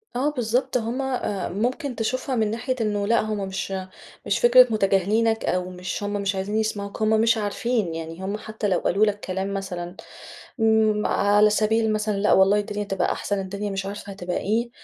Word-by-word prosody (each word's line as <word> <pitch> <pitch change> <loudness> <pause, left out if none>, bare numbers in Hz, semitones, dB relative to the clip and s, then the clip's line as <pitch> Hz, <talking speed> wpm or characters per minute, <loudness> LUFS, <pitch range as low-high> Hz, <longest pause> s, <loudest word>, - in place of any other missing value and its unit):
آه، 265 +4 +1
بالضبط 250 -1 0
هُم، 240 +3 -2
آآ، 250 -8 -2
ممكن 250 - -2
تشوفها 255 +4 -2
من 220 -3 +1
ناحية 245 +3 -2
إنه 205 -2 0
لا 230 +2 +3
هُم 215 -2 -3
مش 190 0 -4 0.5
مش - - +1
فكرة 250 +1 +7
متجاهلينك، 215 +3 +2
أو 180 0 -1
مش 180 +2 -5
هُم 205 0 -2
مش 200 -1 -1
عايزين 195 +2 -3
يسمعوك 205 -2 -3
هُم 215 - +3
مش 225 +1 +3
عارفين، 210 -3 -1
يعني 165 +2 -6
هُم 200 +2 -2
حتى 215 0 -4
لو 185 -3 +2
قالوا 205 +4 +2
لك 205 -1 -1
كلام 190 0 -3
مثلًا، 180 -2 -5 0.6
امم، 220 -1 +3
على 205 +1 +4
سبيل 220 +1 +2
مثلًا 215 -1 -1
لا 205 +1 +3
والله 195 +2 +5
الدنيا 205 0 -3
هتبقى 195 -2 -1
أحسن، 205 -1 -2
الدنيا 200 +2 -4
مش 195 0 -3
عارفة 200 0 -6
هتبقى 180 -2 -4
إيه، 230 +4 0
210 Hz, 185 wpm, -24 LUFS, 195-225 Hz, 0.6 s, فكرة